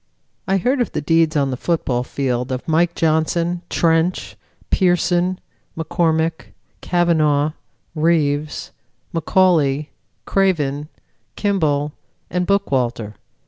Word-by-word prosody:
I 195 0 +2
heard 250 +8 +1
of 240 - -2
the - - -1
deeds 165 +1 +2
on 140 -2 +1
the - - -2
football 130 -6 -1
field 125 -1 -2
of 130 0 -4
Mike 165 +2 +2
Johnson, 165 +2 +1
Trench, 165 +2 +1 0.4
Pearson, 180 0 +2 0.4
McCormack, 160 0 0 0.4
Cavanaugh, 155 -4 +2 0.4
Reeves, 155 -2 0 0.4
McCauley, 160 -4 +2 0.4
Craven, 150 -7 0 0.5
Kimball 150 -8 0 0.4
and 180 0 -1
Bookwalter. 125 - 0
160 Hz, 100 wpm, -20 LUFS, 145-175 Hz, 0.5 s, I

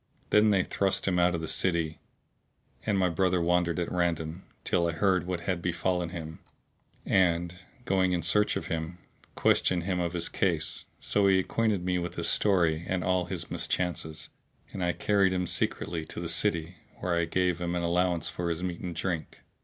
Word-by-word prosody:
Then 105 +1 +5
they 95 -3 +3
thrust 95 -1 0
him 90 -2 +2
out 90 0 +3
of 85 - -3
the 80 - -4
city, 85 -3 +1 0.9
and 105 -2 +2
my 95 -1 +3
brother 90 +1 +1
wandered 85 0 +1
at 85 - -2
random, 85 0 -1 0.2
till 85 -1 +1
I 85 - -1
heard 90 0 +1
what 90 -2 -2
had 90 0 -2
befallen 90 0 -1
him; 80 -2 -7 0.7
and, 90 -2 +2 0.3
going 95 -3 +2
in 90 -1 0
search 105 +5 +2
of - - -3
him, 85 +1 -4 0.4
questioned 90 -2 +2
him 90 0 -1
of 85 -1 -1
his 85 -1 -1
case; 80 -9 -1
so 100 -1 +2
he 95 -1 +5
acquainted 100 -1 0
me 90 -1 +1
with 90 0 -4
his 85 0 -1
story 85 -6 +2
and 95 -1 -1
all 90 -1 +1
his - - -6
mischances, 80 -3 -2 0.4
and 95 - -3
I 90 0 +1
carried 100 -2 +2
him 90 0 0
secretly 85 -1 -1
to - - -6
the 85 - -3
city 85 -1 +1 0.2
where 90 - -2
I 85 -1 0
made 90 -2 +2
him 90 0 -2
an 85 - -1
allowance 85 -1 +1
for 85 -1 -2
his 85 +1 -3
meat 90 -2 -3
and 90 -3 -5
drink. 85 -1 -3
90 Hz, 190 wpm, -28 LUFS, 85-95 Hz, 0.9 s, Then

